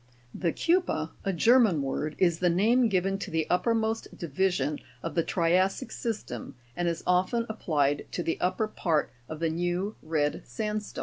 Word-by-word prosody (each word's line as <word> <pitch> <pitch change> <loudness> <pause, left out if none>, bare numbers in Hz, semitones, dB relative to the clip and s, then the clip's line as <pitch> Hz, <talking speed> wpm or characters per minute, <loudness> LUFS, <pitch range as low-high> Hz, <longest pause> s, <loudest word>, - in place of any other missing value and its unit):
32. - - -7
The 170 -3 +1
KEU'PER 340 - +1 0.2
(a 195 - +2
German 220 - +4
word) 150 +3 -2
is 170 -3 +2
the 180 - +3
name 225 +7 +3
given 195 0 +1
to - - -5
the 160 -1 -1
uppermost 225 +3 +1
division 155 -3 0 0.2
of 165 - -3
the 165 - +2
tria'ssic 185 +8 +1
system, 210 - -5 0.2
and 175 0 -1
is 170 -1 -2
often 185 +6 +2
ap 220 0 -6
plied 145 -3 +1
to 175 - -2
the 165 - -1
upper 185 +4 +1
part 165 -7 0 0.2
of 155 - -6
the 165 -1 +1
new 175 +5 -1
red 155 -2 0
sandstone 210 - -2 0.2
formation. - - -4
180 Hz, 180 wpm, -28 LUFS, 160-215 Hz, 0.2 s, German